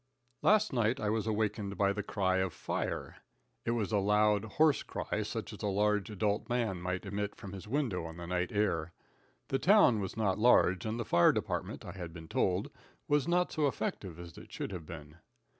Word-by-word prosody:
Last 215 -4 +4
night 120 +1 +1
I 105 -4 0
was 110 0 -1
awakened 105 -2 -1
by 100 0 +3
the 105 - -2
cry 95 -2 0
of 95 -2 0
fire. - - -3 0.5
It - - +1
was 105 -3 -2
a 105 - +3
loud, 105 +1 +3
hoarse 150 +7 +3
cry, - - -3
such - - -4
as - - -10
a - - -1
large, 105 +1 +1
adult 105 +2 -1
man 115 -7 -1
might 90 +2 -3
emit 100 +1 -3
from 100 -1 -9
his 95 0 -8
window 115 - -1
on 80 0 -8
the 85 - -6
night 90 0 -1
air. 85 -6 0 0.6
The 135 - +1
town 190 - +5
was 95 +1 -4
not 105 -3 +1
large, 105 -5 +4
and 110 +2 -2
the 115 - -2
fire 85 -3 +5
department, - - -3
I - - -6
had 90 -4 -7
been 80 -1 -10
told, 90 +3 0 0.4
was 145 -2 +2
not 180 +1 +2
so 155 -3 +1
effective 95 - -3
as 85 -2 -10
it - - -14
should - - -4
have 85 -5 -7
been. 75 -1 -10
105 Hz, 205 wpm, -32 LUFS, 90-115 Hz, 0.6 s, town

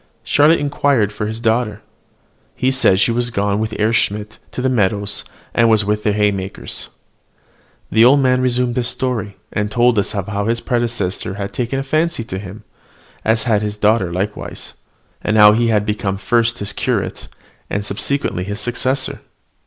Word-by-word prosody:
Charlotte 150 +3 +4
inquired 140 -7 +1
for 105 0 -3
his 110 +1 -5
daughter. 115 -1 0 0.7
He 130 +1 +1
said 130 -8 +3
she 115 - +3
was 120 +1 0
gone 100 -2 0
with 110 0 -1
Herr 110 +2 +1
Schmidt 105 -1 -1
to - - -7
the 130 - +1
meadows, 105 -4 +1 0.3
and 115 0 +4
was 110 -2 +3
with 105 +1 0
the 105 - +1
haymakers. 100 -2 -2 1.0
The 110 +1 +5
old 135 +4 +6
man 130 -1 +3
then - - -1
resumed 125 -1 0
his 120 -1 +1
story, 125 -5 -2 0.2
and 105 -1 -1
told 120 0 +3
us 100 - -2
how 100 0 -2
his 115 +1 +1
predecessor 115 -7 -2
had 100 -1 -5
taken 125 +2 -2
a 135 - -1
fancy 155 0 0
to 95 -4 -5
him, 100 +1 -9 0.6
as 110 0 +2
had 110 -4 +2
his 105 0 -3
daughter 105 -4 +2
likewise; 95 +4 -4 0.5
and 110 - +1
how 105 0 +9
he 115 +2 +2
had 105 -2 +2
become 105 -2 -2
first 115 +3 +1
his 100 - -4
curate, - - -2 0.4
and 100 0 -2
subsequently 105 -2 -2
his 100 +3 -4
successor. 130 +4 -1
110 Hz, 175 wpm, -18 LUFS, 105-125 Hz, 1.0 s, how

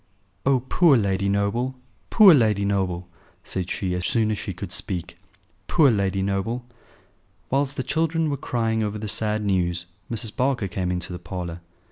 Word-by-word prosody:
"Oh! 135 -2 +4
poor 165 -5 +5
Lady 100 -2 0
Noble! 100 +6 0 0.3
poor 205 -5 +8
Lady 110 -7 +3
Noble!" 95 -3 -1 0.4
said 90 -1 -3
she, 95 -2 -2
as 90 0 -2
soon 110 +2 +1
as 105 - -1
she - - -4
could 90 0 -7
speak. 90 -3 -3 0.5
"Poor 150 -6 +5
Lady 100 -2 0
Noble!" 100 +5 -2 0.9
Whilst 140 +1 0
the 130 - -1
children 160 +1 0
were - - 0
crying 115 -4 -1
over 105 0 -2
the 105 0 -5
sad 105 +1 0
news 90 -3 0 0.2
Mrs. 115 -2 -3
Barker 125 -5 0
came 90 -1 -2
into 90 0 -3
the 90 - -6
parlour. 85 -1 -6
105 Hz, 165 wpm, -24 LUFS, 95-125 Hz, 0.9 s, poor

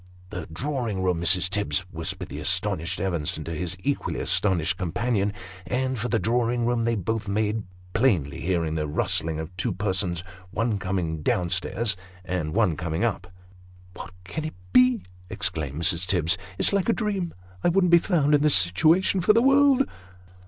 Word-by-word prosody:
" 90 0 -24
The 90 -6 -6
drawing 115 - -2
room, 90 -3 0
Mrs. 90 +1 +4
Tibbs! 95 -5 0
" - - -22
whispered 90 +2 -4
the - - -6
astonished 85 +4 -1
Evenson 85 -5 -1
to 80 - -5
his 90 +3 -3
equally 145 0 -1
astonished 95 -2 +1
companion; 100 +3 -1 0.4
and 130 +2 -1
for 120 +3 -2
the 115 - +2
drawing 120 +1 0
room 120 -1 +1
they 115 0 +1
both 110 +1 -2
made, 105 +2 0 0.3
plainly 95 - +1
hearing 85 -3 0
the 75 -1 -2
rustling 80 +1 0
of 80 +3 -7
two 95 - -1
persons, 95 -3 -1 0.3
one 105 +1 -1
coming 90 -4 -2
down 85 +3 0
stairs, 105 +4 -1 0.3
and 85 -4 -3
one 105 -8 +3
coming 85 +3 -2
up. 100 -6 -2 0.3
" 90 0 -24
What - - -8
can 155 - -5
it 155 - -5 0.2
be? 125 -5 +5
" 90 0 -24
exclaimed 75 -5 -2
Mrs. 85 +1 +1
Tibbs. 90 -2 +2
" 95 0 -18
It's - - +3
like 200 +2 +1
a - - +5
dream. 200 -6 -2 0.3
I - - +4
wouldn't 180 0 +3
be 170 - +8
found 155 -5 +1
in 145 - +4
this 150 -1 +5
situation 160 - +4
for 210 - +5
the 230 - +4
world 275 0 +5
95 Hz, 185 wpm, -25 LUFS, 85-125 Hz, 0.4 s, be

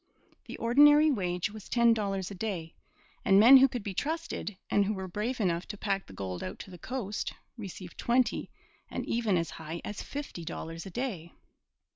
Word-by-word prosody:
The - - -8
ordinary 295 +6 +6
wage 180 -5 -1
was 215 -2 -11
ten 235 -1 +5
dollars 195 -3 -2
a - - -5
day, 180 -5 -4 0.5
and 195 0 +5
men 245 +6 +10
who 265 +1 +7
could 245 -5 -5
be 200 -2 -4
trusted, 305 - -3
and 205 - +3
who 210 +2 -1
were 190 -1 -5
brave 215 +7 -3
enough 175 -4 0
to 205 - -6
pack 195 -1 -2
the - - -12
gold 95 -2 -5
out 95 - -5
to 190 - -11
the 180 - -11
coast, 220 -2 -4 0.2
received 195 -5 -9
twenty 240 0 +1 0.4
and - - -4
even 225 -5 +1
as 165 -1 -2
high 160 +1 -6
as 210 - -5
fifty 285 - -6
dollars 165 +1 -6
a - - -6
day. 190 -7 -4
205 Hz, 190 wpm, -30 LUFS, 180-240 Hz, 0.5 s, men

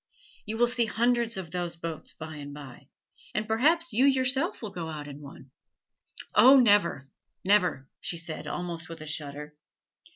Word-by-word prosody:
You 220 +1 -3
will 240 - +5
see 240 -1 +2
hundreds 235 0 +1
of 175 -4 -6
those 175 -1 -3
boats 165 -1 -6
by 155 -1 -8
and 145 0 -8
by, 140 -4 -11 0.5
and 215 0 -1
perhaps 320 +10 +2
you 255 +5 +4
yourself 265 - +1
will 210 - -5
go 165 -2 -5
out 150 -2 -6
in 145 0 -9
one." 140 -2 -13 0.8
"Oh, 265 +2 +8
never, 205 - +3 0.4
never!" 185 -9 +2
she 170 - -2
said, 165 -1 -5
almost 175 -1 -4
with 165 -1 -8
a - - -7
shudder. 150 -1 -4
175 Hz, 165 wpm, -28 LUFS, 155-235 Hz, 0.8 s, Oh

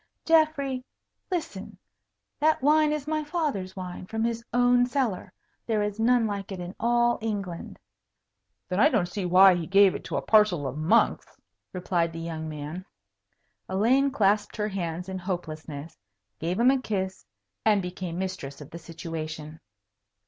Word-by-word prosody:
"Geoffrey, 300 -5 +2 0.5
listen! 335 -3 -4 0.6
That 310 -2 +2
wine 305 +1 +4
is 300 -2 -2
my 310 0 -1
father's 295 - -2
wine, 180 -1 -7
from 225 +2 -2
his 230 0 -1
own 245 0 +4
cellar. 250 -7 -1 0.4
There 215 -2 +1
is 210 +1 -3
none 240 +1 +3
like 200 -2 -4
it 190 - -5
in 175 +1 -6
all 240 0 +2
England." 200 -6 -4 0.9
"Then 185 - -1
I 295 - +6
don't 185 - +2
see 195 0 -4
why 185 +2 +7
he 170 -2 -3
gave 195 0 +5
it - - -6
to - - -3
a - - 0
parcel 210 -9 +4
of 135 0 -3
monks," 160 +10 +1 0.3
replied 175 -2 -1
the 165 - -6
young 160 -1 -5
man. 155 +4 -6 0.9
Elaine 240 +9 +3
clasped 205 -5 +1
her 210 0 -1
hands 180 -2 -4
in 190 0 -4
hopelessness, 160 -4 -5 0.4
gave 175 +5 -2
him 245 +2 +6
a 270 -1 +1
kiss, 190 -5 -3 0.4
and 215 -2 +4
became 180 -2 -5
mistress 185 -7 -5
of 150 - -11
the 170 - -8
situation. 160 -2 -7
195 Hz, 155 wpm, -27 LUFS, 175-240 Hz, 0.9 s, why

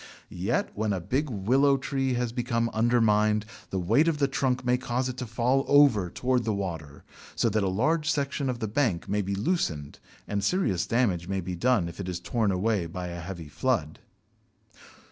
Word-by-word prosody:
Yet 95 +8 -1
when 110 0 -1
a 95 - -1
big 135 - -1
Willow 130 +6 +3
tree 135 -1 -1
has 120 -1 -1
become 115 -1 -1
undermined, 110 -2 +3 0.2
the 95 - -3
weight 110 - +3
of 165 -2 +1
the 140 -1 +2
trunk 130 -2 -1
may 125 0 +3
cause 125 0 -2
it 130 - -4
to 125 - -4
fall 125 +4 +1
over 135 -11 +5
towards 125 +5 0
the 110 -2 -1
water, 80 -7 -5 0.3
so 115 - +2
that 110 0 +1
a 95 - +1
large 155 - +1
section 140 -2 -1
of 125 - -2
the 110 - -3
bank 110 -6 0
may 105 +1 0
be 100 0 -2
loosened 95 - -2 0.3
and 100 -1 -2
serious 100 - +1
damage 100 -8 +1
may 95 0 -1
be 90 0 -4
done 105 0 +2
if 85 - -9
it 95 -2 -4
is 90 -1 -3
torn 105 +3 0
away 95 -1 0
by 90 +1 -5
a 85 0 -6
heavy 85 -2 -7
flood. 75 - -1
110 Hz, 195 wpm, -27 LUFS, 95-130 Hz, 0.3 s, over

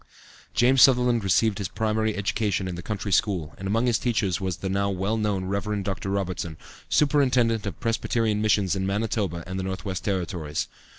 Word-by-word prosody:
James 125 +2 +4
Sutherland 125 -4 +5
received 100 +2 +2
his 100 - -2
primary 110 +2 -1
education 100 -1 -1
in 90 - -4
the 85 - -6
country 100 +1 -4
school, 90 -7 +1
and 95 - -4
among 115 +5 +1
his 120 -3 +2
teachers 105 -8 0
was 95 -2 -2
the 95 - -4
now 100 +1 0
well 95 +3 -1
known 105 -4 -1
Rev. 100 +1 -2
Dr. 95 0 -3
Robertson, 90 -5 -3 0.3
Superintendent 125 -7 +2
of 95 - -6
Presbyterian 115 -2 0
Missions 100 -3 +2
in 95 0 -1
Manitoba 100 -4 -1
and 95 +2 -4
the - - -2
North 95 +2 -4
West 95 -4 -3
Territories. 90 -6 -2
100 Hz, 180 wpm, -25 LUFS, 95-110 Hz, 0.3 s, Sutherland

